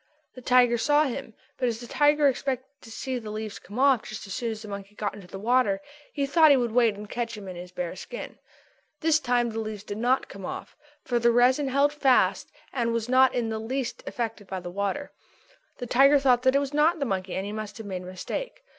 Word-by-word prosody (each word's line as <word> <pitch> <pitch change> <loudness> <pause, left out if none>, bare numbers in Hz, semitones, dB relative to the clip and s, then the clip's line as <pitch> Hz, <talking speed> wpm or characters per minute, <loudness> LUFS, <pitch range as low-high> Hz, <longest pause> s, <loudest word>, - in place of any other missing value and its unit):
The 255 - -11
tiger 245 -1 +4
saw 295 +5 +4
him, 265 -5 -4 0.2
but 255 - +1
as 225 -1 -4
the 240 - -8
tiger 295 +3 +3
expected 260 -1 -1
to 230 - -13
see 250 +3 -4
the 220 -2 -8
leaves 215 0 -5
come 205 +5 -11
off 265 -3 +4
just 215 +1 -8
as 195 - -7
soon 235 +1 -2
as 220 0 -6
the - - -9
monkey 200 0 -8
got 210 -1 -2
into 200 -3 -11
the 195 - -8
water, 255 +7 +2 0.3
he 280 -2 -1
thought 315 +3 +5
he 280 - +6
would 240 -3 0
wait 230 -2 +3
and 210 +1 -9
catch 230 0 -4
him 200 -2 -9
in 185 - -7
his 175 +1 -9
bare 180 -1 -4
skin. 340 - -8 0.6
This 315 -1 +3
time 245 -4 +1
the 225 - -4
leaves 215 -2 -5
did 205 0 -6
not 250 +3 +1
come 195 - -10
off, - - -6 0.3
for 240 -1 +1
the 235 0 +4
resin 255 +4 +4
held 280 +2 +3
them 295 - -17
fast 265 -3 +3 0.2
and 235 -3 0
was 230 0 -2
not 260 0 +5
in 235 -2 0
the 220 0 -3
least 255 +3 -3
affected 225 -4 -4
by 190 0 -4
the 175 -1 -7
water. 200 +10 -3 0.7
The 245 - -5
tiger 275 +4 +5
thought 255 -3 +3
that 260 +1 +3
it - - +5
was 280 0 -3
not 310 +4 +3
the 280 - -1
monkey 190 -5 -2
and 190 - -2
that - - -4
he - - -5
must 215 -1 -6
have 225 - -8
made 185 -2 -4
a - - -10
mistake. 485 - -6
240 Hz, 250 wpm, -26 LUFS, 210-270 Hz, 0.7 s, he